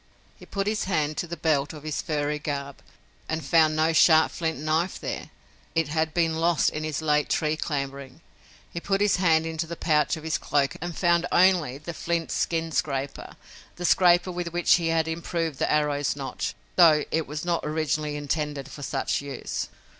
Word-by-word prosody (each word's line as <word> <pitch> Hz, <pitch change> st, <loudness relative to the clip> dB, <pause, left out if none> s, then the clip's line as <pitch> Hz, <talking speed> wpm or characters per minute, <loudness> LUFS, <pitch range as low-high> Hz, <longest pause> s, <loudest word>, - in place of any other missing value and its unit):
He -, -, -15 dB
put 195 Hz, -1 st, -2 dB
his 210 Hz, 0 st, -1 dB
hand 155 Hz, -5 st, 0 dB
to 175 Hz, -, -2 dB
the 170 Hz, +1 st, -6 dB
belt 150 Hz, -2 st, +1 dB
of 150 Hz, -2 st, -10 dB
his 155 Hz, -1 st, -3 dB
furry 150 Hz, -1 st, -2 dB
garb 140 Hz, -2 st, -4 dB, 0.5 s
and 160 Hz, -2 st, -2 dB
found 155 Hz, +1 st, +4 dB
no 160 Hz, +1 st, +2 dB
sharp 160 Hz, 0 st, +5 dB
flint 160 Hz, -3 st, -2 dB
knife 155 Hz, +5 st, -1 dB
there! -, -, -5 dB, 0.5 s
It 165 Hz, -3 st, +1 dB
had 160 Hz, +1 st, 0 dB
been 165 Hz, -1 st, +1 dB
lost 165 Hz, 0 st, +2 dB
in 155 Hz, -, -4 dB
his 155 Hz, 0 st, -3 dB
late 150 Hz, -1 st, +2 dB
tree 155 Hz, 0 st, +1 dB
clambering. 140 Hz, -2 st, -4 dB, 0.5 s
He 170 Hz, -, -3 dB
put 195 Hz, +3 st, 0 dB
his 205 Hz, -2 st, +3 dB
hand 165 Hz, -3 st, +3 dB
into 165 Hz, 0 st, -3 dB
the 170 Hz, -, -5 dB
pouch 155 Hz, -1 st, +1 dB
of 155 Hz, -, -10 dB
his 160 Hz, -1 st, -1 dB
cloak 140 Hz, -1 st, 0 dB
and 175 Hz, -1 st, -5 dB
found 170 Hz, -1 st, +2 dB
only 175 Hz, -8 st, +3 dB
the 155 Hz, +4 st, -7 dB
flint 170 Hz, 0 st, -2 dB
skin 165 Hz, -1 st, -1 dB
scraper, 140 Hz, -3 st, -3 dB, 0.4 s
the 175 Hz, -, -5 dB
scraper 175 Hz, 0 st, +4 dB
with 175 Hz, -1 st, -4 dB
which 175 Hz, +1 st, +3 dB
he 170 Hz, -2 st, -2 dB
had 165 Hz, -1 st, +1 dB
improved 165 Hz, -2 st, -3 dB
the -, -, +1 dB
arrow's 145 Hz, -2 st, +1 dB
notch, 135 Hz, -2 st, -4 dB, 0.2 s
though 160 Hz, -4 st, +6 dB
it 160 Hz, 0 st, 0 dB
was 150 Hz, +3 st, -5 dB
not 175 Hz, -1 st, 0 dB
originally 155 Hz, -1 st, -1 dB
intended 145 Hz, -1 st, -3 dB
for 145 Hz, -, -9 dB
such 140 Hz, -, -1 dB
use. 140 Hz, -2 st, -5 dB
160 Hz, 190 wpm, -26 LUFS, 150-170 Hz, 0.5 s, though